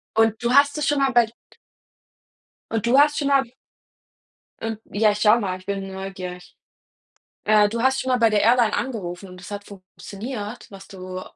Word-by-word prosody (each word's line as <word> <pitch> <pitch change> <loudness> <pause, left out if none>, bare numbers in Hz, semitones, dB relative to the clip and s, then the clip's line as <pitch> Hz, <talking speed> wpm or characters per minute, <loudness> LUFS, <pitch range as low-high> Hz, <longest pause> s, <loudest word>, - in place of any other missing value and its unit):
Und 225 0 +2
du 240 +1 +1
hast 285 +2 +4
es 300 - -1
schon 295 -1 +2
mal 270 -1 +2
bei 240 -1 +5 1.5
Und 225 0 -1
du 245 +3 +3
hast 295 0 +4
schon 285 - -1
mal 275 -1 +4 1.2
Und 225 -1 -4
ja, 215 +1 +3
ich 205 - -4
schau 215 +2 +5
mal, 185 -3 -3
ich 185 - -19
bin 195 -1 -4
neugierig. 190 -2 -8 0.9
Äh, 210 -1 +4
du 230 +2 -3
hast 265 +1 +2
schon 260 - -4
mal 250 - +3
bei 230 -1 +4
der 210 -1 +2
Airline 230 -1 +4
angerufen 195 -7 -4
und 180 - -12
es 180 - -11
hat 205 0 -6
funktioniert, 205 +4 -8
was 195 -1 -12
du 185 -1 -8
215 Hz, 185 wpm, -23 LUFS, 195-245 Hz, 1.5 s, bei